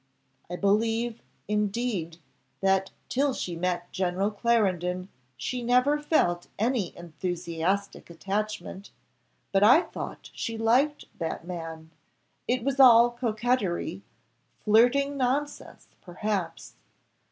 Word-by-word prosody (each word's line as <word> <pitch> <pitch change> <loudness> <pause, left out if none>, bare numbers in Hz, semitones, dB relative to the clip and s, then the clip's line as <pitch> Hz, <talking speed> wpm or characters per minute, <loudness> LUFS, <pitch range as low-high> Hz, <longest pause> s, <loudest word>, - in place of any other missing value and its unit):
I 175 - -4
believe, 225 +4 0 0.3
indeed, 210 -5 -1 0.4
that 195 0 +2 0.2
till 275 0 +1
she 175 - -4
met 175 0 -2
General 190 +2 0
Clarendon 190 -5 0 0.3
she 250 - -3
never 250 +5 +3
felt 175 - +1
any 225 -4 -1
enthusiastic 175 +3 -3
attachment, 200 +2 -4 0.6
but 195 - +3
I 245 +11 +7
thought - - -8
she 230 -1 -4
liked 250 +7 +2
that 165 0 -4
man 165 -2 -7 0.6
it 250 -1 0
was 275 +1 -1
all 240 -2 +8
coquetry, 220 -7 -1 0.6
flirting 250 +6 +4
nonsense 275 +3 -2
perhaps. 195 0 -4
210 Hz, 100 wpm, -27 LUFS, 180-245 Hz, 0.6 s, all